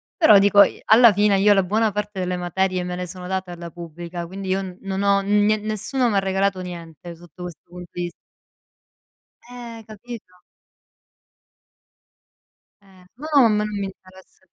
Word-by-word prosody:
Però, 220 - +6
dico, 200 0 +6
i - - -3
alla 230 0 +7
fine, 205 0 +2
io 205 +1 +5
la 195 - +3
buona 215 +4 0
parte 210 -1 -4
delle 180 0 -2
materie 185 +1 -1
me 180 - -4
le 180 0 -4
sono 180 0 -9
date 190 -1 -3
alla 170 -1 -8
pubblica, 170 +1 -8
quindi, 190 +2 -7
io 190 +1 0
n 185 -2 -8
non 195 0 -3
ho 200 0 +3
nien 210 +2 +2
nessuno 215 +4 -1
m'ha 200 - +2
regalato 195 0 0
niente 170 -1 -9
sotto 175 +1 -13
questo 175 -3 -8
pun 180 +1 -10
vis 175 -1 -5 1.4
Eh, 235 -2 -9
capito? 215 -4 -11 2.4
Eh. 190 -2 -20
Ma 300 +4 -7 0.2
om 215 -2 +3
non 210 0 0
mi 200 - -2
interessa 190 -1 -14
190 Hz, 160 wpm, -22 LUFS, 180-210 Hz, 2.4 s, alla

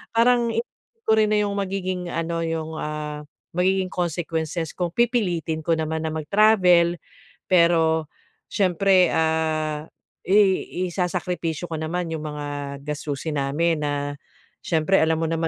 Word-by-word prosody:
parang 235 0 +4
hindi 235 - -6
ko 220 - +5
rin 215 -1 +3
na 210 - +3
'yong 205 -1 0
magiging 185 -2 -3
ano 165 0 -2
'yong 160 -1 -3
ah, 150 -1 -4 0.3
magiging 185 +1 +2
consequences 165 -2 -2
kung 175 -2 -2
pipilitin 180 -10 0
ko 170 - +2
naman 160 0 -2
na 160 - -2
mag-travel. 180 0 +4 0.6
Pero 165 -3 +4 0.4
siyempre, 190 -1 +3
ah, 155 -1 0 0.4
i 190 - +3 0.6
isasakripisyo 175 -2 -2
ko 160 - -3
naman 165 +2 -3
'yong 160 - -3
mga 150 -1 -5 0.4
gastusin 150 0 -3
namin 155 +4 +1
na 145 -1 -2 0.5
siyempre 165 +4 +2
alam 160 0 +2
mo 165 - -1
naman 165 0 0
165 Hz, 130 wpm, -23 LUFS, 160-185 Hz, 0.6 s, ko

